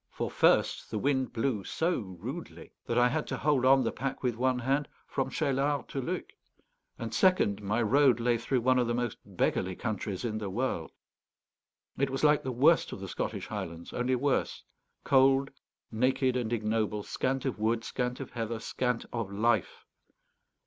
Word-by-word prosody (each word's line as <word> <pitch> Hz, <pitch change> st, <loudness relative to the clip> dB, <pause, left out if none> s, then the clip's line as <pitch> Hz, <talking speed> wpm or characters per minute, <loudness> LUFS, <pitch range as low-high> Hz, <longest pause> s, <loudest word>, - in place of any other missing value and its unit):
For -, -, -4 dB
first, -, -, +2 dB
the 110 Hz, -, -3 dB
wind 130 Hz, +2 st, 0 dB
blew 115 Hz, -3 st, -1 dB
so 165 Hz, -, 0 dB
rudely 110 Hz, -, -8 dB, 0.2 s
that 115 Hz, -, 0 dB
I 120 Hz, 0 st, +6 dB
had 150 Hz, +4 st, -1 dB
to -, -, -3 dB
hold 145 Hz, -4 st, +2 dB
on 135 Hz, 0 st, +6 dB
the 115 Hz, -, 0 dB
pack 135 Hz, +1 st, -4 dB
with 125 Hz, -2 st, +1 dB
one 130 Hz, +2 st, +1 dB
hand 135 Hz, +4 st, 0 dB, 0.2 s
from 135 Hz, -, -2 dB
Cheylard 140 Hz, -1 st, 0 dB
to 135 Hz, -, -3 dB
Luc; -, -, -4 dB, 0.7 s
and 115 Hz, -1 st, -5 dB
second, 115 Hz, -, +3 dB
my 105 Hz, +4 st, 0 dB
road 130 Hz, +1 st, +4 dB
lay 120 Hz, 0 st, +1 dB
through 125 Hz, +2 st, 0 dB
one 130 Hz, +1 st, +3 dB
of 120 Hz, -, +1 dB
the 120 Hz, -, 0 dB
most 120 Hz, -2 st, -2 dB
beggarly 95 Hz, -1 st, -1 dB
countries 105 Hz, -2 st, -3 dB
in 110 Hz, -2 st, -2 dB
the 105 Hz, -2 st, -4 dB
world. 105 Hz, -5 st, -2 dB, 1.1 s
It 140 Hz, 0 st, +2 dB
was 135 Hz, +2 st, -3 dB
like 150 Hz, -1 st, +5 dB
the 130 Hz, -, -3 dB
worst 145 Hz, +7 st, +4 dB
of -, -, -6 dB
the 95 Hz, -, -6 dB
Scottish -, -, -3 dB
Highlands, 85 Hz, -6 st, -6 dB
only 125 Hz, +1 st, +1 dB
worse; 140 Hz, +2 st, 0 dB, 0.4 s
cold, 135 Hz, 0 st, +4 dB, 0.4 s
naked, 130 Hz, +3 st, +1 dB
and 120 Hz, -3 st, -1 dB
ignoble, 110 Hz, -2 st, 0 dB
scant 130 Hz, +5 st, -2 dB
of 130 Hz, -5 st, -2 dB
wood, 115 Hz, +1 st, +1 dB
scant 125 Hz, 0 st, -3 dB
of 135 Hz, -, -7 dB
heather, 115 Hz, -1 st, -3 dB
scant 125 Hz, +1 st, -2 dB
of 115 Hz, -5 st, -3 dB
life. 110 Hz, 0 st, 0 dB
125 Hz, 175 wpm, -30 LUFS, 110-135 Hz, 1.1 s, I